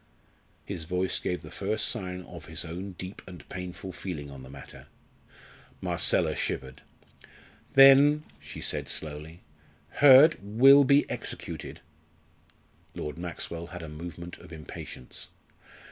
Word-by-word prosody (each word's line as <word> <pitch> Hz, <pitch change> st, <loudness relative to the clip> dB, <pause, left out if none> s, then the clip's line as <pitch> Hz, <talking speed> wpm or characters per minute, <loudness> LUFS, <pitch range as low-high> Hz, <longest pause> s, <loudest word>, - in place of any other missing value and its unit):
His 90 Hz, -5 st, -6 dB
voice 90 Hz, +2 st, 0 dB
gave 90 Hz, -1 st, -3 dB
the 80 Hz, -, -11 dB
first 105 Hz, +2 st, -1 dB
sign 90 Hz, -5 st, -3 dB
of -, -, -11 dB
his 80 Hz, +2 st, -4 dB
own 90 Hz, +4 st, -6 dB
deep 95 Hz, +2 st, -8 dB
and 90 Hz, -4 st, -11 dB
painful 90 Hz, +1 st, -7 dB
feeling 80 Hz, -6 st, -6 dB
on 70 Hz, -1 st, -10 dB
the 65 Hz, -, -12 dB
matter. 70 Hz, 0 st, -12 dB, 0.9 s
Marcella -, -, +2 dB
shivered. 65 Hz, +1 st, -3 dB, 0.9 s
"Then," 140 Hz, +2 st, +7 dB, 0.2 s
she -, -, -9 dB
said -, -, -1 dB
slowly, 80 Hz, +2 st, -4 dB, 0.5 s
"Hurd 145 Hz, +3 st, +7 dB
will 135 Hz, +8 st, +6 dB
be 140 Hz, +2 st, +4 dB
executed." -, -, -6 dB, 1.1 s
Lord 75 Hz, +2 st, -6 dB
Maxwell 85 Hz, -1 st, -5 dB
had 90 Hz, -1 st, -8 dB
a -, -, -7 dB
movement 85 Hz, +3 st, -8 dB
of 90 Hz, 0 st, -14 dB
impatience. 75 Hz, -5 st, -7 dB
90 Hz, 125 wpm, -28 LUFS, 80-105 Hz, 1.1 s, Then